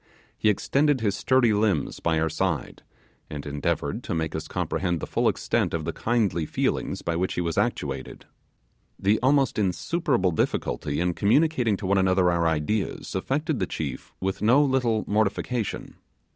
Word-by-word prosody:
He 110 - +2
extended 140 +7 +2
his 105 -3 +1
sturdy 130 -4 +3
limbs 100 -8 0
by 80 -1 +1
our 80 - +1
side, 80 -2 -2 0.5
and 75 -1 -6
endeavoured 75 -1 -2
to - - -2
make 80 -1 -2
us 80 - -4
comprehend 85 -3 -1
the - - -4
full - - 0
extent - - 0
of 80 -2 -3
the - - -2
kindly 100 -9 0
feelings - - -1
by 85 - -1
which 90 +2 -1
he - - 0
was 85 -2 -2
actuated. - - -2 0.7
The 105 +3 +2
almost 135 -2 +2
insuperable 105 - +1
difficulty 75 -2 -1
in 90 +1 +1
communicating 120 - +2
to 100 - -6
one 95 +1 +3
another 95 -1 +3
our 85 -1 +1
ideas 80 +7 -1
affected 135 +8 -1
the 95 - 0
chief 70 -5 -5
with 95 0 -2
no 125 +7 +5
little 125 -6 +1
mortification. 110 +2 -1
95 Hz, 160 wpm, -25 LUFS, 85-120 Hz, 0.7 s, no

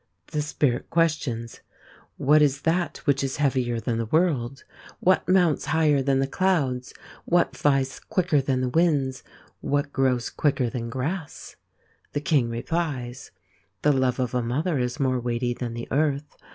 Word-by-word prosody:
The 150 - 0
Spirit 145 -4 -1
questions: 145 -9 0 0.6
What 150 +2 +4
is 140 -1 +2
that 175 +2 0
which 140 -2 +2
is 135 -1 -2
heavier 130 -5 +1
than 115 -1 -2
the 115 - -2
world? 135 -4 0 0.4
What 185 0 +2
mounts 180 -5 +3
higher 155 -3 +3
than 135 0 +2
the 135 - +2
clouds? 135 -6 0 0.3
What 175 0 +2
flies 135 -2 +1
quicker 180 -6 +1
than 130 -1 0
the 130 - 0
winds? 140 -4 +1 0.4
What 145 0 -1
grows 130 -3 +1
quicker 130 -5 0
than 115 -1 -4
grass? 145 +7 -5 0.6
The 145 - 0
King 145 -5 +1
replies: 130 0 -3 0.5
The 150 - +4
love 130 -1 +1
of 125 -1 -1
a 125 - +1
mother 140 +6 -1
is 125 +3 -2
more 130 -2 +1
weighty 120 0 -1
than 120 -1 -5
the 120 - -6
earth. 145 0 0
135 Hz, 155 wpm, -25 LUFS, 125-155 Hz, 0.6 s, What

